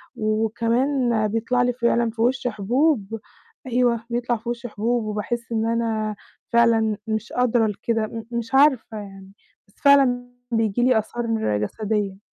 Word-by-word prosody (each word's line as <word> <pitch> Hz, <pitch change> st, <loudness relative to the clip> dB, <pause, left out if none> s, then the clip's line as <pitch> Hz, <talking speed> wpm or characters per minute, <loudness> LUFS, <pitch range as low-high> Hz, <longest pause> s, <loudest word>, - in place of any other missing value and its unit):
وكمان 230 Hz, +2 st, +1 dB
بيطلَع 230 Hz, +3 st, 0 dB
لي 245 Hz, 0 st, +1 dB
فعلًا 235 Hz, -1 st, +1 dB
في 225 Hz, 0 st, -6 dB
وشي 245 Hz, +1 st, +1 dB
حبوب. 225 Hz, +1 st, 0 dB, 0.5 s
أيوه، 240 Hz, -2 st, +1 dB
بيطلَع 240 Hz, 0 st, -1 dB
في 230 Hz, +2 st, -7 dB
وشي 240 Hz, 0 st, -4 dB
حبوب، 230 Hz, +3 st, -1 dB
وباحس 220 Hz, +3 st, -4 dB
إن 225 Hz, -1 st, 0 dB
أنا 225 Hz, -2 st, -1 dB, 0.4 s
فعلًا 225 Hz, -2 st, +3 dB
مش 220 Hz, 0 st, -3 dB
قادرة 240 Hz, -2 st, +2 dB
لكده، 220 Hz, +1 st, -1 dB
م 225 Hz, 0 st, -7 dB
مش 235 Hz, +1 st, -4 dB
عارفة 265 Hz, -6 st, +3 dB
يعني. 195 Hz, -2 st, -10 dB, 0.4 s
بس 200 Hz, -, -29 dB
فعلًا 255 Hz, -3 st, +4 dB, 0.2 s
بييجي 225 Hz, 0 st, +1 dB
لي 250 Hz, -2 st, +4 dB
آثار 240 Hz, +2 st, -4 dB, 0.3 s
جسدية. 205 Hz, -, -2 dB
230 Hz, 140 wpm, -23 LUFS, 215-245 Hz, 0.5 s, فعلًا